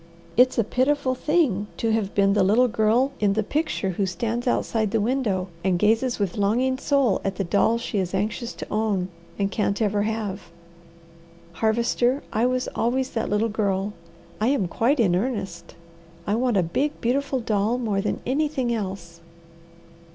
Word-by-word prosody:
It's 250 +2 +4
a 230 - +4
pitiful 260 +4 +1
thing 255 - +1
to 225 - 0
have 215 -3 -1
been 200 0 +4
the 205 - +3
little 220 +7 +4
girl 230 +4 +2
in 205 -2 +2
the 215 +1 0
picture 290 -6 -1
who 190 +2 -1
stands 230 +7 -2
outside 220 -3 0
the 225 +2 +1
window 210 -5 0
and 185 -1 +2
gazes 225 +6 +2
with 200 -2 -2
longing 250 +6 +1
soul 275 -9 +2
at 195 -1 -2
the 195 - -1
doll 205 +5 +2
she 235 -3 -3
is 185 0 -2
anxious 215 +4 -2
to - - -8
own 205 -4 0 0.3
and 195 -1 0
can't 205 -2 0
ever 205 -2 +1
have. 205 -4 -3 1.0
Harvester, 235 - +1
I 225 +3 +2
was 255 0 -1
always 255 +3 0
that 225 - -2
little 210 +2 +1
girl. 205 -2 -1 0.5
I 215 - +1
am 255 -9 +1
quite 250 - +1
in 190 -7 +3
earnest. 190 -6 -3 0.5
I 205 - 0
want 240 -1 +1
a 185 - +3
big, 275 - -1
beautiful 265 +2 0
doll 220 0 0
more 215 -5 -1
than 210 - -2
anything 265 -2 0
else." 185 -6 -5
220 Hz, 170 wpm, -24 LUFS, 200-250 Hz, 1.0 s, It's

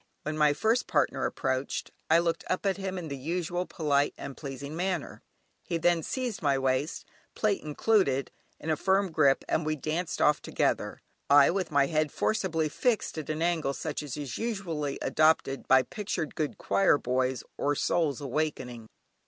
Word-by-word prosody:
When 155 - -3
my 150 -1 +4
first 220 +11 +1
partner - - +1
approached 130 +1 -2 0.2
I 160 - +6
looked 170 -1 0
up 185 - -1
at 195 -1 +1
him 190 -1 -4
in 175 -3 -5
the 140 - -4
usual 175 +5 -2
polite 145 -3 +1
and 140 -1 -7
pleasing 140 +1 -7
manner; 180 -2 -2 0.4
he 170 - -2
then 170 0 +2
seized 245 - -3
my 140 -3 +2
waist, 135 +3 -1 0.3
plait 210 -2 +1
included, 150 -3 +1 0.3
in 160 - -2
a - - +3
firm 190 +3 +1
grip 145 -4 +3
and 155 - +1
we 155 0 0
danced 155 +4 -3
off 150 0 +3
together, - - -1 0.3
I 140 +1 +7
with 185 -1 -1
my 140 -2 +3
head 155 0 0
forcibly 180 -7 0
fixed 225 +9 0
at 155 - -7
an 155 +1 -1
angle 165 -5 +1
such 155 -2 -3
as 145 -2 -6
is 145 -4 -5
usually 175 -11 -2
adopted 155 -3 +2
by 130 0 +6
pictured 175 - -4
good 155 -2 -2
choir 195 -6 +3
boys 130 -1 -1
or 145 +1 0
"Souls 155 -3 +1
awakening." 130 -5 -3
155 Hz, 170 wpm, -29 LUFS, 140-180 Hz, 0.4 s, I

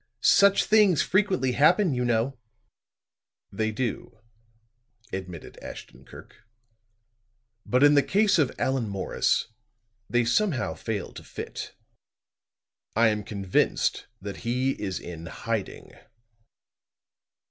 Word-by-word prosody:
Such 200 0 +5
things 210 -6 +4
frequently 185 -9 +1
happen, 160 - +4
you 125 -1 -1
know." 120 +2 0 1.2
"They 110 +2 -1
do," 115 0 -4 1.0
admitted 90 -4 -7
Ashton 60 +2 -11
Kirk. - - -14 1.3
"But 125 +2 +3
in 145 0 +7
the 145 - +6
case 200 +3 +2
of 140 -5 +2
Allan 130 -5 -1
Morris, 100 +3 0 0.6
they 120 +2 +2
somehow 145 - +1
fail 105 -5 -5
to - - -10
fit. - - -7 1.2
I 115 0 +5
am 105 -1 -2
convinced 100 -3 0
that 100 +1 -7
he 125 +3 0
is 95 -3 -3
in 85 -1 -8
hiding." - - -5
120 Hz, 105 wpm, -26 LUFS, 105-150 Hz, 1.3 s, in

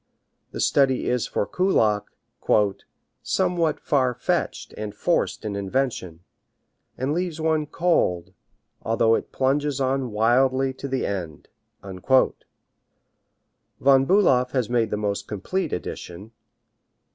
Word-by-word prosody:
The - - -8
study 135 -2 +2
is 125 -2 0
for - - -1
Kullak 110 - +1 1.2
"somewhat 170 -3 0
far 130 -5 +1
fetched 125 - -2
and 105 -1 -6
forced 145 -1 -1
in 105 -2 -3
invention, 100 -5 -2 0.8
and 135 +3 -1
leaves 175 -1 -2
one 155 -1 0
cold, 95 - 0 0.5
although 115 0 +2
it - - -1
plunges 140 +1 0
on 135 -1 0
wildly 130 +5 +2
to 135 +1 -7
the 135 -1 -1
end." 85 -7 -5 0.3
Von 100 +7 +1 1.7
Bulow 135 -9 +4
has 125 -4 -1
made 115 -2 +2
the 105 - -2
most 100 -1 -2
complete 155 - -3
edition. 90 +3 -6
125 Hz, 110 wpm, -24 LUFS, 105-145 Hz, 1.7 s, Bulow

